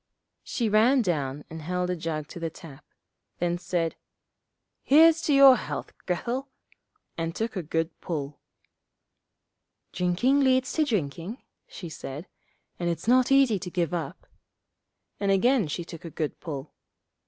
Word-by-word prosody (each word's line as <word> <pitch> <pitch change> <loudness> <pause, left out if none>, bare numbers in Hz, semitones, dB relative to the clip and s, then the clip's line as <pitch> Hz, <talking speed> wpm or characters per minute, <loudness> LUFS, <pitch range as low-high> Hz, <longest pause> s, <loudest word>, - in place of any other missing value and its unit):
She 235 - -2
ran 230 +5 +4
down 145 -6 -2
and 160 0 -8
held 180 +3 -2
a - - -1
jug 155 -3 -4
to - - -8
the 165 -1 -2
tap, 150 -3 -13 0.5
then 175 0 -1
said, 175 -2 -1 0.9
'Here's 325 +3 +6
to 295 - +1
your 275 -1 +9
health, - - -5
Grethel,' 245 +9 -2 0.7
and 165 0 -2
took 225 0 -3
a 185 - -1
good 165 +1 -1
pull. 150 -5 -4 1.5
'Drinking 185 +11 +2
leads 260 -1 +2
to 310 - +2
drinking,' 190 - -3 0.2
she 175 - -8
said, 150 0 -7 0.5
'and 175 -1 0
it's 170 +5 -4
not 255 +2 +4
easy 270 -7 +4
to 180 0 -6
give 175 -2 -1
it - - +2
up,' 165 - -7 0.9
and 200 - 0
again 230 - +3
she 170 +3 -4
took 165 -2 -10
a 170 - -6
good 155 -1 -4
pull. 145 -3 -7
180 Hz, 150 wpm, -27 LUFS, 165-245 Hz, 1.5 s, your